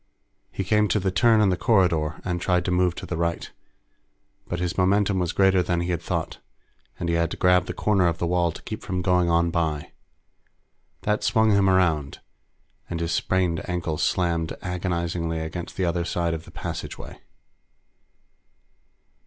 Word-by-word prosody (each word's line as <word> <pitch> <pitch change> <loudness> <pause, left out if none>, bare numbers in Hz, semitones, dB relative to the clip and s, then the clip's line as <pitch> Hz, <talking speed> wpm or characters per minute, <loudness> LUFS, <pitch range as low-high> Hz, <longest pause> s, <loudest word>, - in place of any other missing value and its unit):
He 95 - -3
came 105 +2 +2
to 105 - +1
the 95 -1 0
turn 115 +2 +4
in 105 - +4
the 90 - +2
corridor, 85 -7 +2
and 90 -2 -2
tried 90 0 +1
to - - 0
move 90 -1 +2
to - - -7
the - - -4
right, 85 0 -2 1.0
but 90 - -3
his 90 -1 -2
momentum 95 +1 +2
was 90 -2 0
greater 95 -1 +3
than 85 -1 0
he 85 +1 -2
had 85 - -2
thought, - - -3 0.6
and 85 - -2
he 85 - 0
had 85 -1 +1
to - - -6
grab 90 -1 +3
the - - -3
corner 100 -4 +2
of 85 -1 0
the 85 - -1
wall 85 0 +1
to - - -11
keep - - -6
from 90 -1 -3
going 90 -2 +2
on 85 0 +2
by. 80 -4 -2 1.1
That 105 0 0
swung 110 -2 +3
him 100 -1 +4
around, 85 -7 +1 0.7
and 85 - -3
his 85 0 -2
sprained 90 -1 0
ankle 85 -3 -2
slammed 85 -3 0
agonizingly 85 -2 -2
against 85 +2 -6
the 95 - +1
other 85 0 0
side 85 -1 -1
of 80 0 -6
the - - -13
passageway. - - -7
90 Hz, 180 wpm, -24 LUFS, 85-95 Hz, 1.1 s, turn